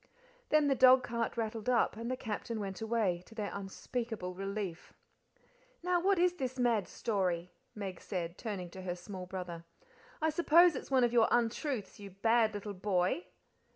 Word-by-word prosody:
Then 305 Hz, -1 st, +4 dB
the 275 Hz, -, +4 dB
dogcart 255 Hz, -3 st, +4 dB
rattled 225 Hz, 0 st, -2 dB
up; 240 Hz, -4 st, +3 dB
and 230 Hz, +2 st, -5 dB
the 255 Hz, -, -1 dB
Captain 225 Hz, -1 st, -4 dB
went 195 Hz, 0 st, -5 dB
away, 220 Hz, -6 st, 0 dB
to 225 Hz, -, -15 dB
their 210 Hz, -2 st, -3 dB
unspeakable 200 Hz, 0 st, -4 dB
relief. 195 Hz, -2 st, -5 dB, 0.9 s
"Now 355 Hz, -1 st, +2 dB
what 390 Hz, +1 st, +3 dB
is 355 Hz, 0 st, +3 dB
this 260 Hz, -3 st, -3 dB
mad 235 Hz, -5 st, +2 dB
story?" 180 Hz, -5 st, -1 dB, 0.2 s
Meg 195 Hz, -4 st, -5 dB
said, 175 Hz, -3 st, -4 dB
turning 190 Hz, -6 st, -5 dB
to 190 Hz, -, -8 dB
her 180 Hz, -1 st, -3 dB
small 180 Hz, 0 st, -8 dB
brother. 180 Hz, -3 st, -6 dB, 0.6 s
"I 315 Hz, 0 st, +2 dB
suppose 340 Hz, +1 st, +5 dB
it's -, -, -6 dB
one 260 Hz, -2 st, +4 dB
of 240 Hz, 0 st, +2 dB
your 230 Hz, -2 st, +5 dB
untruths, 240 Hz, -1 st, -1 dB
you 200 Hz, -1 st, -8 dB
bad 220 Hz, +3 st, +2 dB
little 205 Hz, 0 st, -5 dB
boy." 185 Hz, -, 0 dB
220 Hz, 165 wpm, -33 LUFS, 190-250 Hz, 0.9 s, suppose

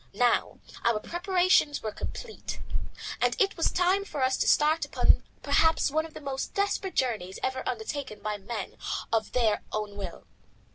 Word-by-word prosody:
Now 240 Hz, +2 st, +2 dB, 0.3 s
our 235 Hz, -2 st, +3 dB
preparations 355 Hz, -, +2 dB
were 215 Hz, -, -2 dB
complete, 445 Hz, -, -6 dB, 0.6 s
and -, -, +2 dB
it 395 Hz, -3 st, +3 dB
was 330 Hz, -, +2 dB
time 365 Hz, +2 st, +3 dB
for 290 Hz, -9 st, -3 dB
us 260 Hz, 0 st, +3 dB
to -, -, +1 dB
start 310 Hz, +2 st, +4 dB
upon -, -, +3 dB, 0.2 s
perhaps 320 Hz, -3 st, +3 dB
one 315 Hz, +2 st, +1 dB
of 315 Hz, -, -20 dB
the -, -, -6 dB
most 275 Hz, -2 st, -4 dB
desperate 400 Hz, -1 st, 0 dB
journeys 210 Hz, -8 st, 0 dB
ever 260 Hz, 0 st, 0 dB
undertaken 240 Hz, -1 st, -4 dB
by 210 Hz, 0 st, -2 dB
men 205 Hz, 0 st, -6 dB, 0.4 s
of 225 Hz, -1 st, +1 dB
their 225 Hz, -4 st, +2 dB
own 210 Hz, -1 st, -3 dB
will. 200 Hz, -1 st, -7 dB
265 Hz, 160 wpm, -28 LUFS, 220-340 Hz, 0.6 s, start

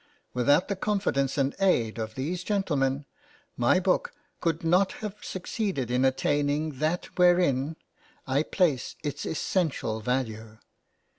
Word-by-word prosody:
Without 145 Hz, +8 st, +3 dB
the 200 Hz, -, -1 dB
confidence 190 Hz, -10 st, 0 dB
and 140 Hz, 0 st, +1 dB
aid 120 Hz, -, +2 dB
of 110 Hz, 0 st, -4 dB
these 170 Hz, +7 st, -3 dB
gentlemen, 145 Hz, -9 st, 0 dB, 0.5 s
my 185 Hz, -, +3 dB
book 185 Hz, 0 st, +1 dB, 0.3 s
could 165 Hz, -1 st, -1 dB
not 180 Hz, +4 st, +3 dB
have 210 Hz, -2 st, -5 dB
succeeded 185 Hz, -, -3 dB
in 125 Hz, +1 st, +2 dB
attaining 145 Hz, +2 st, +1 dB
that 160 Hz, +3 st, 0 dB
wherein 170 Hz, -5 st, +3 dB, 0.5 s
I 135 Hz, +1 st, +2 dB
place 155 Hz, -6 st, 0 dB
its 145 Hz, -2 st, -3 dB
essential 155 Hz, -, -1 dB
value. 110 Hz, -2 st, -3 dB
145 Hz, 125 wpm, -27 LUFS, 130-180 Hz, 0.5 s, Without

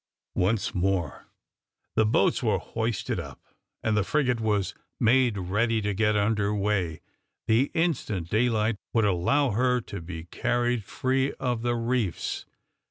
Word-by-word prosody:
Once 100 Hz, +3 st, +1 dB
more 90 Hz, -3 st, -1 dB, 0.7 s
the 110 Hz, -1 st, +4 dB
boats 110 Hz, -, +2 dB
were 110 Hz, -5 st, +2 dB
hoisted 110 Hz, +3 st, -2 dB
up, -, -, -8 dB, 0.4 s
and 110 Hz, -1 st, +1 dB
the 105 Hz, -, +3 dB
frigate 125 Hz, 0 st, +1 dB
was 105 Hz, -4 st, 0 dB, 0.3 s
made 120 Hz, -1 st, +3 dB
ready 105 Hz, +5 st, +1 dB
to 105 Hz, -1 st, -1 dB
get 105 Hz, +1 st, +2 dB
under 105 Hz, 0 st, +1 dB
weigh 100 Hz, -5 st, 0 dB, 0.4 s
the 115 Hz, +5 st, +3 dB
instant 130 Hz, -, 0 dB
daylight 110 Hz, +1 st, +1 dB, 0.2 s
would 115 Hz, -2 st, +3 dB
allow 110 Hz, +9 st, +2 dB
her 125 Hz, +3 st, +2 dB
to 100 Hz, -4 st, -7 dB
be 80 Hz, -1 st, -7 dB
carried 120 Hz, +6 st, 0 dB
free 130 Hz, +6 st, 0 dB
of 125 Hz, -3 st, -2 dB
the 120 Hz, 0 st, 0 dB
reefs. 115 Hz, -6 st, -1 dB
110 Hz, 140 wpm, -27 LUFS, 100-120 Hz, 0.7 s, the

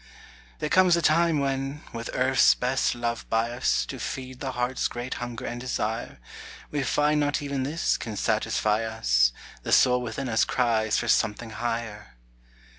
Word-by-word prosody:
There -, -, -2 dB
comes 185 Hz, +1 st, +5 dB
a -, -, 0 dB
time, 165 Hz, +1 st, +3 dB
when, 135 Hz, +2 st, -2 dB
with 115 Hz, 0 st, -5 dB
earth's 130 Hz, +1 st, +4 dB
best 125 Hz, +1 st, 0 dB
love 120 Hz, -1 st, -3 dB
by 115 Hz, +1 st, +1 dB
us, 120 Hz, +2 st, 0 dB
To -, -, -7 dB
feed 130 Hz, -1 st, -6 dB
the 135 Hz, -2 st, -4 dB
heart's 125 Hz, +1 st, -1 dB
great 120 Hz, +1 st, -5 dB
hunger 120 Hz, -2 st, -5 dB
and 120 Hz, 0 st, -5 dB
desire, 115 Hz, -2 st, -3 dB, 0.5 s
We 145 Hz, -, -1 dB
find 150 Hz, +2 st, +2 dB
not 145 Hz, +1 st, +1 dB
even 140 Hz, -2 st, -2 dB
this 150 Hz, +6 st, 0 dB
can 110 Hz, -3 st, -6 dB
satisfy 105 Hz, +2 st, +1 dB
us; -, -, +2 dB, 0.3 s
The -, -, -5 dB
soul 125 Hz, -1 st, +5 dB
within 125 Hz, +3 st, -4 dB
us 110 Hz, -2 st, +2 dB
cries 110 Hz, -3 st, +1 dB
for 120 Hz, -, -2 dB
something 110 Hz, +1 st, +1 dB
higher. 115 Hz, -, -4 dB
125 Hz, 165 wpm, -26 LUFS, 115-135 Hz, 0.5 s, comes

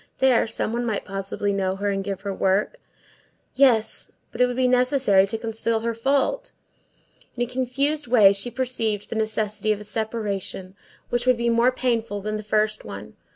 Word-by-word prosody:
There, 260 Hz, -3 st, +3 dB
some 220 Hz, 0 st, -2 dB
one 240 Hz, +1 st, -1 dB
might 220 Hz, -4 st, -2 dB
possibly 195 Hz, +1 st, -3 dB
know 190 Hz, -1 st, -1 dB
her 200 Hz, +1 st, -1 dB
and 195 Hz, 0 st, -2 dB
give 195 Hz, -1 st, -5 dB
her 200 Hz, 0 st, -4 dB
work; 195 Hz, -, 0 dB, 0.8 s
yes, 245 Hz, -5 st, +3 dB, 0.2 s
but -, -, -4 dB
it 250 Hz, -, +5 dB
would 245 Hz, -, -4 dB
be 255 Hz, 0 st, +2 dB
necessary 250 Hz, -6 st, +3 dB
to 225 Hz, -, -2 dB
conceal 225 Hz, 0 st, -1 dB
her 230 Hz, 0 st, -1 dB
fault. 280 Hz, -, 0 dB, 0.8 s
In 240 Hz, -, 0 dB
a -, -, 0 dB
confused 260 Hz, +4 st, -1 dB
way 215 Hz, -5 st, +6 dB
she 200 Hz, +5 st, -1 dB
perceived 230 Hz, -5 st, -2 dB
the -, -, -3 dB
necessity 215 Hz, -1 st, -1 dB
of 210 Hz, -, -1 dB
a -, -, -9 dB
separation 205 Hz, -3 st, -4 dB, 0.3 s
which 240 Hz, +1 st, -1 dB
would 255 Hz, -1 st, +4 dB
be 235 Hz, 0 st, 0 dB
more 235 Hz, +2 st, +3 dB
painful 230 Hz, -5 st, -1 dB
than 215 Hz, +2 st, -3 dB
the -, -, -5 dB
first 215 Hz, 0 st, 0 dB
one. 105 Hz, +2 st, -9 dB
220 Hz, 185 wpm, -23 LUFS, 205-250 Hz, 0.8 s, way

